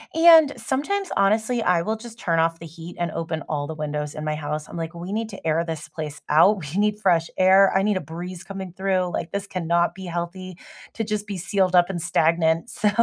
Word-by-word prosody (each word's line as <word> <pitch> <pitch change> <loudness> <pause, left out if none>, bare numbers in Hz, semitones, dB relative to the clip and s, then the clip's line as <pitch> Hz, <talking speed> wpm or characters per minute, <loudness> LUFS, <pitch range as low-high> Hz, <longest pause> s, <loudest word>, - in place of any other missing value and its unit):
And 325 -3 +7
sometimes, 385 +9 -1
honestly, 220 +4 +2
I 180 -4 +2
will 220 +1 -2
just 230 0 -11
turn 165 -6 0
off 165 0 +1
the 165 - -9
heat 165 +2 -10
and 170 -2 -1
open 160 -1 -4
all 145 -2 -2
the 160 - -6
windows 150 -1 -4
in 155 - -5
my 155 0 -1
house. 150 0 -4
I'm - - -9
like, 165 +1 -5
"We 175 +3 -6
need 220 +1 -2
to 195 -5 -11
air 160 +1 +2
this 155 -2 -5
place 150 -2 -6
out, 170 +8 +5 0.2
we 195 - 0
need 210 0 +1
fresh 170 -5 +2
air, 190 +1 +6
I 195 - +2
need 210 -2 +1
a 185 - -3
breeze 170 +3 -7
coming 190 -3 -7
through. 185 -2 0
Like, 165 -1 -3
this 200 0 -3
cannot 170 -2 0
be 190 0 -9
healthy 175 +1 -5 0.4
to 225 - -3
just 210 -1 -3
be 200 -2 -4
sealed 185 +1 +1
up 175 +1 +5
and 175 -3 -4
stagnant." 165 +2 +1
So, 210 - +1
175 Hz, 230 wpm, -23 LUFS, 165-200 Hz, 0.4 s, And